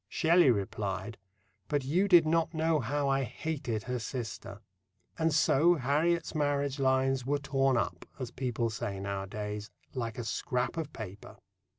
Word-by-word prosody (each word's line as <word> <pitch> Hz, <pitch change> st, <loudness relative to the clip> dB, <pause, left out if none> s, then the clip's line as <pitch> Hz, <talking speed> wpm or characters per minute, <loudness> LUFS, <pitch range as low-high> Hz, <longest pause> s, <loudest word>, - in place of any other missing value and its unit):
Shelley 170 Hz, 0 st, +4 dB
replied: 100 Hz, -1 st, -2 dB, 0.5 s
"But 145 Hz, -2 st, 0 dB
you 175 Hz, +9 st, +2 dB
did 175 Hz, -4 st, +7 dB
not 165 Hz, +1 st, +1 dB
know 160 Hz, 0 st, +2 dB
how 140 Hz, +3 st, -1 dB
I 135 Hz, 0 st, +2 dB
hated 130 Hz, -5 st, -3 dB
her 125 Hz, 0 st, -3 dB
sister." 110 Hz, -3 st, -6 dB, 0.6 s
And 160 Hz, 0 st, +2 dB
so 155 Hz, +3 st, +4 dB
Harriet's 155 Hz, +5 st, +1 dB
marriage 145 Hz, -2 st, 0 dB
lines 130 Hz, -1 st, +2 dB
were, 145 Hz, +3 st, +1 dB
torn 135 Hz, -2 st, +1 dB
up, -, -, -2 dB
as 130 Hz, -4 st, -5 dB
people 120 Hz, -3 st, -1 dB
say 100 Hz, -2 st, -4 dB
nowadays, 105 Hz, +2 st, -4 dB, 0.2 s
like 115 Hz, -4 st, -3 dB
a 120 Hz, -, -3 dB
scrap 125 Hz, +2 st, -1 dB
of 160 Hz, -3 st, -4 dB
paper. 105 Hz, -5 st, -9 dB
135 Hz, 150 wpm, -31 LUFS, 115-150 Hz, 0.6 s, did